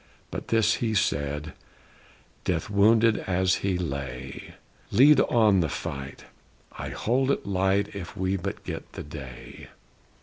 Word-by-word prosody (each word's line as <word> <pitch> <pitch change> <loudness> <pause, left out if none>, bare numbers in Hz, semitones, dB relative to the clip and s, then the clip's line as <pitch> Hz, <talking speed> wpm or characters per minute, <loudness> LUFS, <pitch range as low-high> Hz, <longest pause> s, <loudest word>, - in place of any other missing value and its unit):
But - - -5
this 110 -1 +3
he 110 -2 0
said, 75 -3 -1 0.9
Death 90 +2 -1
wounded 110 +2 +5
as 95 0 +2
he 95 -2 -1
lay: 70 -5 -5 0.3
"Lead 145 +3 +6
on 110 -7 +4
the 80 -3 +1
fight! 70 0 -6 0.5
I - - -5
hold 130 +4 0
it 140 - 0
light 95 +1 +1
If 90 -3 -7
we 95 +1 0
but 90 - -5
get - - -7
the - - -6
day!" 70 -5 -10
95 Hz, 135 wpm, -26 LUFS, 75-110 Hz, 0.9 s, Lead